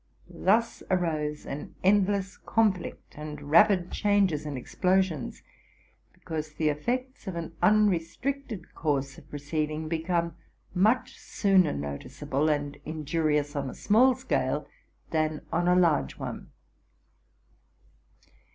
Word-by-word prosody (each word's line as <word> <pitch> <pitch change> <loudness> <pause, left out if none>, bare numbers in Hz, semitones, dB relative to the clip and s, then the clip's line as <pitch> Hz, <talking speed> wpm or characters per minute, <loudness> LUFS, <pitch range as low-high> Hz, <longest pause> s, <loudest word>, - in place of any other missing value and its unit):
Thus 230 +4 +3
arose 155 -5 -1
an 140 +2 -6
endless 195 0 +2
conflict, 200 -8 -1
and 150 -1 -7
rapid 180 +1 +5
changes 195 -8 +2
and 145 -3 -4
ex 125 - -10
plosions; 185 -7 +1 0.7
because 155 -1 -6
the 155 0 +1
effects 250 - -3
of 190 - -3
an 170 -1 -4
uarestricted 215 +3 +1
course 140 -3 -1
of - - -20
proceeding 155 +2 -3
become 170 +1 -1 0.4
much 240 +8 +2
sooner 195 -4 +3
noticeable 70 - -2
and 145 -1 -1
injurious 150 -1 -1
on 140 -2 -2
a - - -8
small 245 +5 +4
scale 260 0 -1 0.4
than 155 -1 0
on 175 +1 +1
a 180 - +5
large 170 -5 +2
one. - - -6
165 Hz, 115 wpm, -28 LUFS, 150-200 Hz, 0.7 s, rapid